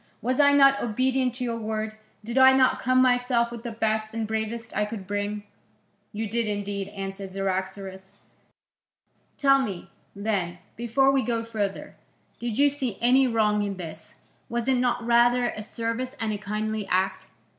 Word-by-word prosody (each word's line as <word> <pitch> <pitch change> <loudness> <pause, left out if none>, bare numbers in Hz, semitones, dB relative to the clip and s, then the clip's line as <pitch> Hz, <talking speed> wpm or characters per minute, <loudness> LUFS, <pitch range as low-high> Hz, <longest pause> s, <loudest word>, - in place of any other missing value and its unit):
Was 250 +4 -1
I 285 -1 +6
not 275 -1 +5
obedient 255 +2 0
to 250 - -4
your 230 -1 -2
word? 215 0 -3 0.3
Did 235 +4 -1
I 265 0 +8
not 260 -1 +3
come 255 0 +3
myself 245 -1 +2
with 235 -1 -7
the 235 - -5
best 220 0 -1
and 225 -1 -1
bravest 220 +1 -4
I 210 - +2
could 210 -2 -5
bring?" 205 +1 -3 0.7
"You 220 +1 -3
did 230 +1 0
indeed," 205 -1 -2
answered 195 -1 -6
Cyaxares. 190 0 -4 1.2
"Tell 275 -1 +5
me, 195 -8 -5 0.2
then, 200 -4 -2 0.2
before 240 +4 +2
we 270 -1 +2
go 230 -2 -1
further, 210 -4 -4 0.4
did 235 -2 -3
you 285 +1 +5
see 270 -7 -2
any 260 +2 +4
wrong 215 -3 +2
in 200 -2 -3
this? 160 -3 -9 0.3
Was 235 +1 -2
it 265 -1 +3
not 245 -1 0
rather 240 +1 +4
a 215 - -7
service 230 +4 -4
and 220 -1 -1
a 205 - -4
kindly 215 0 -3
act?" 190 0 0
225 Hz, 165 wpm, -26 LUFS, 205-245 Hz, 1.2 s, I